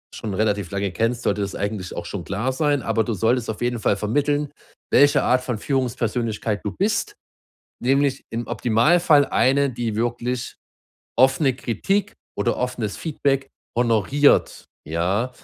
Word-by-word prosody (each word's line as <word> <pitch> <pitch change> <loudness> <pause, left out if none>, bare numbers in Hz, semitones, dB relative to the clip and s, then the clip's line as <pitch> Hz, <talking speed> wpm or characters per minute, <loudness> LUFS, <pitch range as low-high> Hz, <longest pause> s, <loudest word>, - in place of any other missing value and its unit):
schon 105 -3 -5
relativ 105 -3 0
lange 100 -1 -2
kennst, 115 +6 -1
sollte 100 0 0
das 100 -1 -3
eigentlich 100 -2 -4
auch 85 - -5
schon 90 -1 -5
klar 110 +7 -2
sein, 145 -2 +1
aber 115 0 +1
du 115 - -2
solltest 115 +4 +1
auf 110 - -4
jeden 120 -1 -1
Fall 105 -2 +1
vermitteln, 145 +7 0 0.4
welche 145 0 +5
Art 125 0 +3
von 125 -4 -2
Führungspersönlichkeit 115 -4 -1
du 105 - -2
bist, 205 +3 0 0.7
nämlich 135 +1 +1
im 115 +1 -4
Optimalfall 145 +6 +3
eine, 140 +2 +2
die 115 -3 -3
wirklich 120 +1 -2 0.6
offene 135 +1 +4
Kritik 195 - -1 0.2
oder 120 - 0
offenes 120 -4 -3
Feedback 140 -4 -1 0.3
honoriert, 120 +5 +2 0.2
ja? 90 - -1
120 Hz, 145 wpm, -22 LUFS, 105-135 Hz, 0.7 s, welche